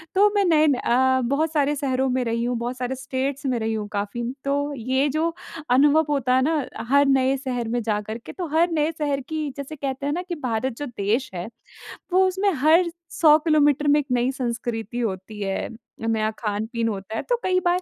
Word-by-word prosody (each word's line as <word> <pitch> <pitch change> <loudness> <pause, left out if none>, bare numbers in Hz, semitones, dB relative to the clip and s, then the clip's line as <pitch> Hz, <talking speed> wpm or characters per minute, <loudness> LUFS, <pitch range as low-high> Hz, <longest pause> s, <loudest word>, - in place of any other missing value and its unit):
तो 410 +2 +6
मैं 400 -1 +3
नए 310 -3 +4
न 290 - +4
अ, 260 +1 +2
बहुत 305 +3 +1
सारे 295 -1 +2
शहरों 265 -2 0
में 255 0 0
रही 230 0 -1
हूँ, 245 0 -1
बहुत 240 +2 -3
सारे 255 +1 -2
स्टेट्स 270 +2 -3
में 255 -2 +1
रही 220 0 -1
हूँ 215 -1 -3
काफ़ी। 205 +3 -3 0.2
तो 285 +1 0
ये 260 +4 +1
जो 330 +1 +1 0.4
अनुभव 290 +5 +5
होता 255 -3 +1
है 260 - +4
ना 300 -1 +1 0.2
हर 280 +1 +5
नए 270 0 +3
शहर 250 -3 -3
में 240 +1 0
जाकर 215 0 -2
के, 235 - -10
तो 360 -3 -4
हर 340 +1 +3
नए 310 -1 +1
शहर 285 -2 0
की 310 -2 -2
जैसे 280 +2 -6
कहते 275 -1 -4
हैं 290 - 0
ना 350 - -2
कि 345 - -2
भारत 230 +2 -2
जो 290 - -4
देश 240 +1 -1
है, 175 +2 -4 0.7
वो 380 +1 +5
उसमें 395 - -1
हर 320 +6 +4 0.2
100 305 -2 +6
किलोमीटर 295 -2 +3
में 290 +1 +5
एक 290 - -3
नई 245 +1 +2
संस्कृति 235 -2 -3
होती 210 -2 -4
है, 195 -1 -2 0.4
नया 220 -1 +1
खान-पीन 220 +2 -2
होता 205 0 -4
है। - - -1
तो - - +4
कई 370 0 +2
बार 355 +1 +2
265 Hz, 210 wpm, -23 LUFS, 235-295 Hz, 0.7 s, तो